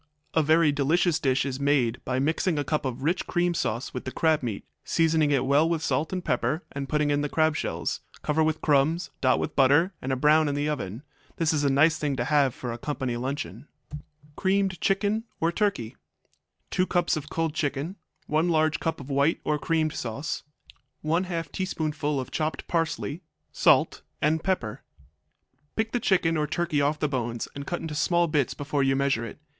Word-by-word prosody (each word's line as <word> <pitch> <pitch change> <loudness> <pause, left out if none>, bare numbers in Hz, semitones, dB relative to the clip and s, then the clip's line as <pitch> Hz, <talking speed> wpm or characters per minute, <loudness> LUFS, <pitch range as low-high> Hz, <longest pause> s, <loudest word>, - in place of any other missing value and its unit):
A 160 - +4
very 155 0 +4
delicious 155 +4 +2
dish 130 -1 +1
is 135 -1 -3
made 140 -5 +1
by 130 0 -1
mixing 160 +5 +1
a 145 - 0
cup 150 +1 -1
of 130 0 -4
rich 170 +4 0
cream 175 -1 +1
sauce 120 -6 -2
with 125 - -4
the 130 - -5
crab 160 +1 +2
meat, 115 -6 -4 0.2
seasoning 160 -2 +2
it 135 -3 +2
well 145 +4 +3
with 165 -2 -1
salt 160 -1 0
and 185 -2 -3
pepper 160 +4 0
and 140 -1 -5
putting 150 -1 +1
in 145 0 +1
the 145 - -2
crab 155 0 +2
shells; - - -2 0.2
cover 150 +1 +1
with 155 0 0
crumbs, 150 +4 +2
dot 130 -1 +4
with - - -3
butter, 145 +8 +4
and 130 0 -2
brown 150 +2 +4
in 140 - -1
the 145 +1 0
oven. 125 -5 -4 0.3
This 165 -1 +1
is 150 -1 +1
a 140 - +3
nice 155 +4 +4
thing 145 -2 -1
to 120 - -1
have 140 -2 +2
for 125 - -5
a 115 - -6
company 130 -3 -3
luncheon. 125 - -4 0.7
Creamed 190 -1 0
Chicken 205 +3 +1
or 165 +1 +2
Turkey 170 - -1 0.8
2 185 - +1
cups 175 -1 +1
of 150 -1 -5
cold 165 -2 -1
chicken. 145 +3 -2 0.3
1 155 +3 +1
large 155 -1 +2
cup 165 - -2
of 140 0 -8
white 140 +4 +2
or 150 -1 0
creamed 160 -1 0
sauce. 125 +6 -4 0.6
1/2 165 -1 -1
teaspoonful 155 -6 -2
of 130 - -6
chopped 155 0 -2
parsley. 165 -1 -1 0.3
Salt - - +3 0.2
and 155 +2 +1
pepper. 125 - -1 0.9
Pick 220 0 -1
the 245 - 0
chicken 175 -6 +2
or 150 -1 0
turkey 160 -1 0
off 145 +2 +1
the 150 - 0
bones 120 -4 -3
and 140 0 -7
cut 175 - -3
into 160 -2 -5
small 170 +3 +2
bits 150 -4 0
before 145 0 -1
you 135 0 +2
measure 135 -4 +1
it. 115 - -7
150 Hz, 195 wpm, -26 LUFS, 135-165 Hz, 0.9 s, A